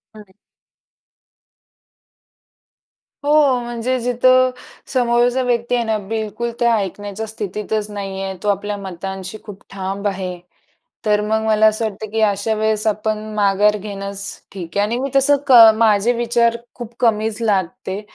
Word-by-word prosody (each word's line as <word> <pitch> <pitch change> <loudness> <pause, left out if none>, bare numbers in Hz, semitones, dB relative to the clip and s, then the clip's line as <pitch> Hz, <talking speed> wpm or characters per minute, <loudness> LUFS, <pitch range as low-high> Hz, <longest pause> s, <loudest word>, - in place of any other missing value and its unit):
हं. 205 -3 -14 2.9
हो 290 - +1 0.3
म्हणजे 240 +2 -2
जिथं 255 +1 +3 0.4
समोरचा 245 0 +2
व्यक्ती 240 0 0
आहे 240 - +1
ना 220 -1 0
बिलकुल 220 +1 -3
त्या 235 -1 +3
ऐकण्याच्या 205 +2 -4
स्थितीतच 210 0 -4
नाही 195 -1 -5
आहे, 190 0 -4
तो - - -3
आपल्या 205 +1 -1
मतांशी 190 +1 -6
खूप 200 -2 -11
ठाम 195 +1 -3
आहे, 185 -2 -3 0.7
तर 210 0 +3
मग 220 +1 0
मला 220 0 +4
असं 215 +1 +2
वाटतं 215 0 -5
की 225 - 0
अशा 210 +1 +1
वेळेस 215 0 0
आपण 215 0 0 0.2
माघार 205 0 +3
घेणंच 200 -1 -6 0.3
ठीक 175 -3 -8
आहे 205 - +3
आणि 235 +3 -2
मी 275 +1 -3
तसं 285 +1 +5
क 270 - +3 0.2
माझे 220 +1 +3
विचार 235 0 +1 0.2
खूप 240 -1 -9
कमीच 220 -2 +1
लादते. 190 -1 -1
215 Hz, 140 wpm, -19 LUFS, 200-235 Hz, 2.9 s, तसं